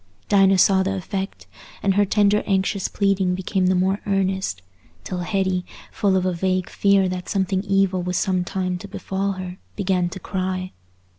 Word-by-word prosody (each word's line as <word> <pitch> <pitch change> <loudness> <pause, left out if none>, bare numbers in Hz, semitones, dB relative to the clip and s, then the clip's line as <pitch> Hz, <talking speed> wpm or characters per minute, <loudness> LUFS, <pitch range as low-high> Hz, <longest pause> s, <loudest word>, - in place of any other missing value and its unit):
Dinah 195 -1 +5
saw 190 +1 +5
the 195 +1 -1
effect, 195 +1 -5 0.4
and 195 - +3
her 205 +1 +3
tender 205 +1 +3
anxious 195 0 +1
pleading 195 -2 +1
became 185 0 0
the 185 - +3
more 190 +2 +1
earnest, 190 - -1 0.4
till 180 - -4
Hetty, 190 0 0 0.3
full 195 -2 +1
of 185 - 0
a 185 - +1
vague 185 +1 -1
fear 200 -1 +3
that 180 0 -4
something 190 -1 0
evil 195 -2 +2
was 180 0 -2
some 185 -3 +1
time 185 0 -2
to 200 - -8
befall 195 0 -2
her, 185 0 -7 0.2
began 185 -3 0
to 190 - -7
cry. 185 0 -3
190 Hz, 170 wpm, -22 LUFS, 185-195 Hz, 0.4 s, Dinah